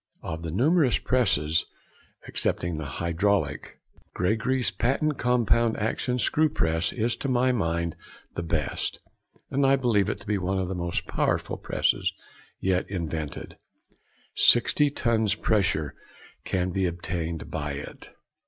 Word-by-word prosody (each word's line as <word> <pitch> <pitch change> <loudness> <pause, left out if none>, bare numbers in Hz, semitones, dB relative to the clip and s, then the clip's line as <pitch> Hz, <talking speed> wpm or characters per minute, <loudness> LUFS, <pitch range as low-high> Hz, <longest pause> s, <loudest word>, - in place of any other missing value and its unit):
Of 80 0 -4
the 85 - -4
numerous 135 - +3
presses, 80 - +2 0.6
excepting 85 -2 0
the 80 - -4
hydraulic, 95 +4 0 0.4
Gregory's 115 +7 +1
Patent 140 +4 0
Compound 120 -2 +2
Action 115 +3 -1
Screw 155 +5 +2
Press 80 - 0
is 115 0 0
to 140 - -3
my 130 0 +3
mind 85 -7 -1 0.4
the - - -3
best, 80 -4 -2 0.5
and 140 - +1
I 135 0 +5
believe 115 -7 +2
it - - -3
to - - -13
be 105 -2 0
one 95 +1 -1
of 95 -1 -1
the - - -2
most 85 -1 -2
powerful - - 0
presses - - 0 0.5
yet 95 -1 0
invented; 80 -5 -4 0.7
sixty 145 +4 +4
tons 110 -6 +1
pressure 95 -10 +1 0.5
can 90 -1 0
be 95 +1 +1
obtained 85 -1 -4
by 75 -2 -3
it. 70 +1 -8
95 Hz, 135 wpm, -26 LUFS, 85-120 Hz, 0.7 s, I